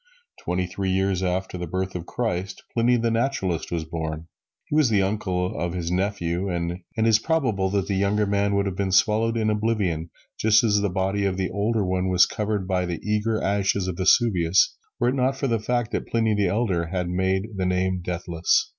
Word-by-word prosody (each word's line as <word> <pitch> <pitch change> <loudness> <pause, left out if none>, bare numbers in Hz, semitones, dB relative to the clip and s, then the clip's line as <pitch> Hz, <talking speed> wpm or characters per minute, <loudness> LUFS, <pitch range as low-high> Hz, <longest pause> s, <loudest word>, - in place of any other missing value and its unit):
Twenty 90 +1 -1
three 95 +1 -3
years 95 0 +1
after 90 0 -2
the 90 - -4
birth 95 +3 -3
of 90 -1 -6
Christ, 95 -5 -3
Pliny, 120 +1 +3
the 115 0 0
Naturalist, 115 - -1
was 85 -2 -2
born. 80 -1 -4 0.4
He - - -3
was 150 -5 +4
the 100 -3 +3
uncle 95 -3 -1
of 85 -1 -2
his 85 -1 -3
nephew, 95 -1 -1
and 85 0 -2 0.2
it 110 - +2
is 110 -1 +5
probable 115 -11 0
that 100 -1 0
the 100 - -2
younger 100 +2 +1
man 100 0 +1
would 100 0 +1
have 95 -2 -2
been 95 0 -1
swallowed 110 +4 +3
in 110 -1 +1
oblivion, 105 -7 -1 0.3
just 110 0 +4
as 105 -3 +3
the 100 - +1
body 95 +2 -1
of 95 -2 0
the 95 -1 -1
older 105 0 0
one 95 0 0
was 90 -1 +5
covered 105 -3 -2
by 90 -1 0
the 85 -2 -3
eager 105 +1 0
ashes 100 -1 +1
of 90 -2 -3
Vesuvius, 95 -3 +3 0.2
were 120 - +3
it - - 0
not 135 0 +1
for 135 - -2
the 115 -4 +1
fact 120 +1 -1
that - - -3
Pliny 115 -2 +1
the 105 -2 +1
Elder 95 -4 0
had 90 +1 -2
made 95 +3 0
the 95 -1 0
name 90 0 0
deathless. 85 -1 0
95 Hz, 210 wpm, -24 LUFS, 90-110 Hz, 0.4 s, is